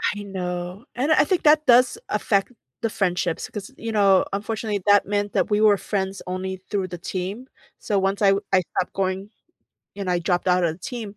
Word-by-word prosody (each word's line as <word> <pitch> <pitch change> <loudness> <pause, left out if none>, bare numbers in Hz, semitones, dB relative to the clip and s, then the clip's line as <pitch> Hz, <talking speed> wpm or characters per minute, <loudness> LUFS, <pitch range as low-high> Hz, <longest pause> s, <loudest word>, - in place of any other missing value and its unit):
I 205 - -6
know, 180 +1 -5
and 270 +6 0
I 310 - +6
think 360 +3 0
that 305 0 +5
does 255 - +5
affect 200 +2 0 0.3
the 230 - 0
friendships 180 -5 -1
‘cause, 205 -2 -7
you 230 - -4
know, 200 -3 +4
unfortunately, 210 0 -2
that 205 -1 +6
meant 205 0 -1
that - - +1
we 210 0 +2
were 210 -2 +5
friends 195 -1 -3
only 185 +1 -3
through 195 -3 -1
the 175 0 -7
team. 190 +8 -5 0.3
So, 205 - -1
once 195 +1 0
I 205 - +5
w 195 +1 +2
I 185 - +5
stopped 180 - -1
going 190 +1 -2 0.7
and 195 -2 -3
I 175 - +2
dropped 175 +1 -1
out 180 0 +3
of 160 -2 0
the - - -17
team, 210 +1 -7
200 Hz, 205 wpm, -23 LUFS, 185-215 Hz, 0.7 s, I